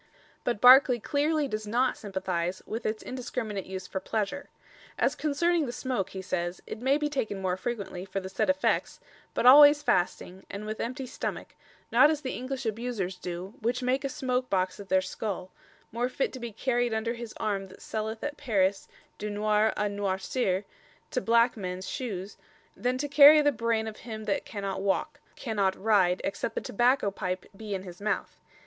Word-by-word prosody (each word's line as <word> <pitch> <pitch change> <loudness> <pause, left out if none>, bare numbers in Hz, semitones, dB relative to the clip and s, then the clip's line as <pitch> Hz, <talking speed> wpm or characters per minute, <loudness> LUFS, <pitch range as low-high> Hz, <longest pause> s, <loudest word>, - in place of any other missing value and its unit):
But 240 -4 -1
Barclay 250 +1 +8
clearly 295 +4 +1
does 215 -3 -4
not 245 +4 +2
sympathize 185 -3 -3
with 225 +2 -4
its 215 0 -3
indiscriminate 235 -6 -4
use 190 0 -6
for 190 - -4
pleasure. 220 +8 -3 0.5
"As - - +2
concerning 310 +1 +1
the - - -3
smoke," 250 -6 -2
he 190 -1 -7
says, 175 -1 -2
"it 220 - -7
may 270 +3 +3
be 300 0 0
taken 220 -9 -2
more 185 -1 0
frequently, 200 -3 -4
and 190 +2 -8
for 195 - -2
the 190 - -7
said 190 - -1
effects, 285 +1 +1 0.4
but - - 0
always 290 +3 +9
fasting, 185 +1 0
and 200 +2 -6
with 215 0 -5
emptie 255 +3 -3
stomack, - - -5 0.4
not 260 +6 +7
as 310 -1 -1
the 260 - -3
English 255 +1 -4
abusers 220 -4 -2
do, 180 +2 -6
which 245 +3 -1
make 255 +2 +1
a 275 - -1
smoke 255 -2 -1
boxe 185 0 0
of 200 - -9
their 190 0 +3
skull, 190 -1 -4 0.4
more 240 +2 -1
fit 265 - -1
to 260 - -7
be 235 -1 -5
carried 240 +1 0
under 225 +1 -1
his 235 -2 -8
arme 200 -2 -2
that 185 - -15
selleth 220 0 -4
at 295 0 -3
Paris 200 -6 +1 0.3
dunoir 210 +1 +1
a - - +1
noircir 200 0 -1 0.5
to 255 - 0
blacke 235 +1 +4
mens 185 -2 -5
shooes 205 -7 -5 0.4
then 250 +1 -1
to 290 +3 -2
carie 290 +1 +8
the 290 - +4
braine 230 -2 0
of 215 - -7
him 220 -2 -7
that 205 -2 -1
can 200 -2 -6
not 195 -1 -2
walke, 200 +10 -1 0.2
can 225 -4 -5
not 190 -1 +2
ryde 195 -4 +3
except 220 +3 -3
the - - -1
Tabacco 240 -1 +2
Pype 185 -2 -3
be 210 -1 -5
in 190 - -5
his 180 0 -11
mouth." 210 +1 -2
220 Hz, 190 wpm, -28 LUFS, 195-255 Hz, 0.5 s, always